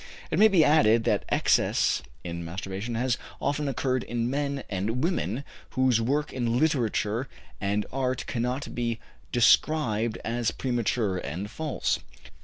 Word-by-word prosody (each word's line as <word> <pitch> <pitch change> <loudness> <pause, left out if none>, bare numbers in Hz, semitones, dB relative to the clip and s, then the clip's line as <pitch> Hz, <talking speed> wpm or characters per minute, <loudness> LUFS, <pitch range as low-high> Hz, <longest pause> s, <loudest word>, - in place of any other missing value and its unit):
It - - +1
may 215 - +9
be 180 -7 +5
added 115 -7 +5
that - - +1
excess - - +2 0.2
in 85 -1 -5
masturbation 95 +6 -5
has 120 +1 0 0.2
often 145 +1 -1
occurred 130 -1 0
in 120 +1 -2
men 140 -1 -1
and 110 +7 -2
women 140 - -1 0.3
whose 130 -3 +4
work 145 +6 0
in 120 -2 0
literature 125 -5 +1 0.3
and 100 +1 0
art 130 -1 -1
cannot 125 +3 -2
be 115 -2 -1 0.3
described 120 -3 +3
as 115 0 0
premature 115 -6 -1
and 90 +8 -5
false. 155 +1 -1
120 Hz, 135 wpm, -27 LUFS, 110-140 Hz, 0.3 s, may